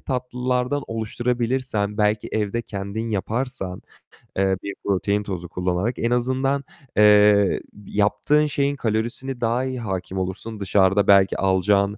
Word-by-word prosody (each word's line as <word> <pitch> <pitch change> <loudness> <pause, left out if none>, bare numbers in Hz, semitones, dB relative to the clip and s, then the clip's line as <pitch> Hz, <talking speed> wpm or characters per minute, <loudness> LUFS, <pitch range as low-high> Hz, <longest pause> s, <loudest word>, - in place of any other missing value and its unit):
tatlılardan 125 +1 -1
oluşturabilirsen, 115 -1 -2
belki 105 0 +1
evde 110 +2 -1
kendin 100 +3 -5
yaparsan, 110 -2 -3 0.6
eee, 95 -1 +2
bir 100 - -4
protein 100 +1 0
tozu 90 -4 -5
kullanarak 90 +7 -1
en 115 - 0
azından, 130 +3 0 0.3
eee, 105 -1 +6 0.3
yaptığın 105 +10 +2
şeyin 140 -1 0
kalorisini 120 +2 -2
daha 120 +2 +1
iyi 130 -1 -3
hâkim 95 -4 -4
olursun. 100 +4 -5
Dışarıda 95 0 +3
belki 100 -1 +5
alacağın 100 +2 +2
105 Hz, 120 wpm, -23 LUFS, 100-125 Hz, 0.6 s, eee